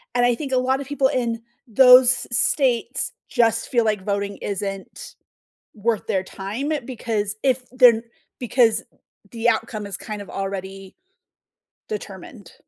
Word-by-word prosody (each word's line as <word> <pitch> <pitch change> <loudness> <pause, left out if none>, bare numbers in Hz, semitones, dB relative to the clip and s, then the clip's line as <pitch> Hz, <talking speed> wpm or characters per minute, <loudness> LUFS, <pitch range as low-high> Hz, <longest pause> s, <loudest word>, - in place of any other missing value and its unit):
and 245 - +3
I 245 - +3
think 275 +2 -6
a - - +3
lot 260 +1 +1
of 275 - -7
people 285 -2 +1
in 235 -3 -2 0.3
those 250 +1 +6
states 255 -2 +1 0.2
just 230 -2 +1
feel 240 -2 +2
like 210 -3 -1
voting 200 -1 -2
isn't 195 -1 -6 0.6
worth 220 0 -2
their 190 -1 0
time 210 +10 -5
because 220 -5 -3
if 260 -1 +1
they're 250 -2 +6
n 225 - -7 0.4
because 235 -2 +2 0.5
the 235 0 +1
outcome 215 -5 -2
is 195 - -5
kind 215 -2 -7
of 200 - -11
already 195 0 -6 0.9
determined. 430 -1 -8
230 Hz, 140 wpm, -22 LUFS, 205-255 Hz, 0.9 s, those